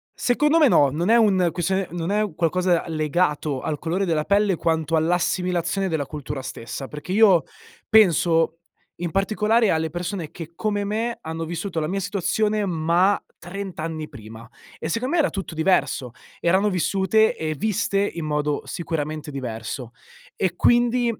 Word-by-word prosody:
Secondo 295 +6 +2
me 305 -4 +6
no, 145 - +5
non 165 +7 -1
è 230 - +6
un 195 -6 +4
questione 190 +2 -1
non 175 0 -3
è 210 -4 0
qualcosa 175 +1 +1
legato 155 -3 0
al 150 - -2
colore 175 +6 -1
della 160 -4 0
pelle 200 0 +2
quanto 160 -1 0
all'assimilazione 180 +3 0
della 160 -4 -1
cultura 145 -2 -6
stessa 130 +1 -6
perché 150 +4 -7
io 195 -5 +5 0.4
penso, 170 -6 +4 0.4
in 175 -1 -4
particolare, 215 +2 +2
alle 160 0 +1
persone 175 0 -4
che 165 -1 -9
come 205 +1 -1
me 225 +3 -2
hanno 160 +1 -4
vissuto 170 +1 -3
la 155 - -1
mia 195 +3 -1
situazione, 210 +3 0
ma 175 +3 +2 0.2
30 195 0 -7
anni 155 -1 -4
prima 115 -3 -11 0.3
e, 160 - -4
secondo 250 - -1
me, 345 - +4
era 285 - +2
tutto 190 -4 -5
diverso; 160 -6 +1 0.3
erano 190 +4 +2
vissute 195 +3 +2
e 155 -1 -3
viste 200 +2 0
in 170 -5 -2
modo 150 -1 -1
sicuramente 155 -2 -4
diverso. 120 -2 -5 0.4
E, 185 -3 0
quindi, 240 +4 +3
175 Hz, 155 wpm, -23 LUFS, 155-200 Hz, 0.4 s, me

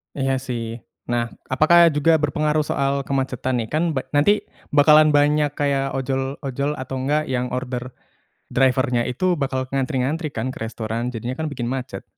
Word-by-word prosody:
Iya 135 -1 0
sih, 115 -2 -4 0.3
nah 120 -1 +1 0.2
apakah 165 +5 +6
juga 155 +3 +4
berpengaruh 150 +1 +1
soal 140 0 0
kemacetan 130 -2 -2
nih? 115 -2 -3
Kan 155 - +2
ba 130 -4 -3
nanti 205 +9 +3 0.2
bakalan 150 +1 +6
banyak 150 0 +3
kayak 140 -1 +1
ojol-ojol 135 +1 -2
atau 130 +1 -5
nggak 150 +3 0
yang 125 -1 -2
order 125 0 -4 0.6
driver-nya 130 -2 +2
itu 175 +8 0
bakal 130 -2 -2
ngantri-ngantri 135 +3 -1
kan 115 +3 -2
ke - - -7
restoran? 115 +2 -4
Jadinya 120 +3 -4
kan 160 - -2
bikin 120 -3 -3
macet. 130 0 -5
135 Hz, 155 wpm, -22 LUFS, 125-145 Hz, 0.6 s, apakah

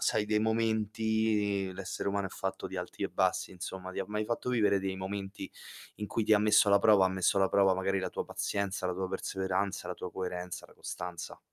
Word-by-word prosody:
sai 105 - +2
dei 105 0 +2
momenti 110 -2 +1
l'essere 95 +1 -3
umano 100 0 0
è - - -21
fatto 95 -1 -4
di 95 0 -5
alti 90 - -6
e - - +1
bassi - - +1
insomma, 95 0 -6
ti - - -5
ha 95 - 0
mai 105 +1 -1
fatto 120 +3 -2
vivere 110 -5 +3
dei 95 -1 -2
momenti 95 +1 -5 0.5
in 105 - -4
cui 110 +1 -1
ti 110 - +3
ha 105 - +7
messo 105 0 +5
alla 100 0 +6
prova 100 -2 +6
ha - - +4
messo 95 +1 +2
alla 95 -1 +4
prova 95 -1 +5
magari 95 +1 0
la 95 - -2
tua - - -4
pazienza, 100 -1 -2
la 90 - -1
tua 95 +1 -2
perseveranza, 95 +1 -2
la 90 - -3
tua 90 - -6
coerenza, 90 -1 -4
la - - -19
costanza. 90 -2 -6
100 Hz, 220 wpm, -31 LUFS, 95-105 Hz, 0.5 s, ha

